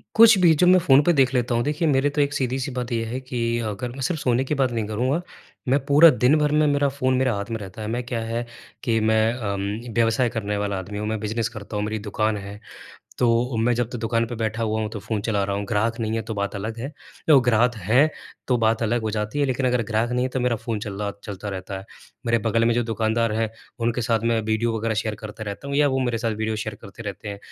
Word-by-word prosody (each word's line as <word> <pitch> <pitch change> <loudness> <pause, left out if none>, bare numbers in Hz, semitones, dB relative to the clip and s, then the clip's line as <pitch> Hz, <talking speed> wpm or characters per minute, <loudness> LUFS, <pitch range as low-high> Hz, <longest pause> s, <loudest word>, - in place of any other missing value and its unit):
कुछ 225 -2 +8
भी 170 -3 +6
जब 180 - +5
मैं 185 +1 +7
फ़ोन 135 +1 +7
पे 175 - +4
देख 135 -3 +3
लेता 120 -1 +1
हूँ, 120 - +1
देखिए, 150 +4 0
मेरे 140 0 +3
तो 145 +1 0
एक 145 0 +1
सीधी 130 -2 -1
सी 135 +1 -3
बात 125 0 -4
ये 115 -1 0
है 120 +3 -4
कि 120 -2 -2
अगर 120 +4 -4
मैं 135 +2 -8
सिर्फ 155 +5 -1
सोने 125 +1 +2
की 150 +3 -2
बात 130 -2 +2
नहीं 115 -2 -1
करूँगा, 130 +10 0 0.5
मैं 135 +3 +4
पूरा 150 +3 +8
दिन 125 +3 +3
भर 150 -1 +2
में 150 0 +3
मेरा 145 -1 +2
फ़ोन 130 -1 0
मेरे 130 -1 +2
हाथ 100 +2 -4
में 115 - -1
रहता 100 +2 -8
है। 105 - -4
मैं 120 +2 -2
क्या 120 -1 -3
है 115 +1 -2 0.4
कि, 115 -3 +1
मैं 110 +1 +2
अम, 105 0 -4
व्यवसाय 115 +2 +2
करने 105 -3 -3
वाला 100 -1 -2
आदमी 100 +3 -7
हूँ, 105 +1 -3
मैं 110 0 -2
बिज़नेस 110 +1 -2
करता 105 -2 -8
हूँ 105 - 0
मेरी 110 0 -3
दुकान 105 +1 -1
है, 100 +1 -8 0.6
तो 120 0 +2
मैं 115 +2 +2
जब 120 -1 -1
तक 120 - -5
दुकान 115 +1 0
पर 120 - -6
बैठा 110 0 -2
हुआ 110 0 0
हूँ 110 - -2
तो 110 - -5
फ़ोन 110 +1 -3
चला 105 -3 +1
रहा 100 0 -2
हूँ, 100 - -3
ग्राहक 115 +4 0
नहीं 110 -1 -1
है 115 - -1
तो 110 0 -5
बात 100 0 -2
अलग 110 +3 -4
है, 135 +6 -5 0.4
यो 150 -3 +8
ग्राहक 120 0 +3
हैं 115 - +3 0.4
तो 125 - +3
बात 110 0 +2
अलग 115 +1 0
हो 110 - -1
जाती 105 +4 -3
है 145 - +3
लेकिन 130 0 0
अगर 125 -1 +2
ग्राहक 115 +2 0
नहीं 125 +1 +1
है - - 0
तो 130 - -2
मेरा 120 -2 +1
फ़ोन 115 -1 -3
चल 105 - -5
रहा 105 -1 -1
चलता 105 0 -6
रहता 95 0 -5
है। 95 - -10 0.4
मेरे 115 0 +3
बगल 115 +1 +1
में 120 - +3
जो 120 - +2
दुकानदार 115 0 0
हैं 110 +1 0 0.3
उनके 120 +1 0
साथ 115 0 +1
मैं 115 -1 +2
वीडियो 110 +1 0
वगैरह 110 0 -1
शेयर 110 0 -1
करते 110 0 -9
रहता 105 +7 -6
हूँ 140 - -2
या 145 0 +4
वो 135 -1 0
मेरे 120 -3 0
साथ 115 -1 -1
वीडियो 110 0 -2
शेयर 110 0 -4
करते 100 +4 -10
रहते 100 +1 -6
हैं। 100 -1 -6
115 Hz, 270 wpm, -23 LUFS, 110-125 Hz, 0.6 s, कुछ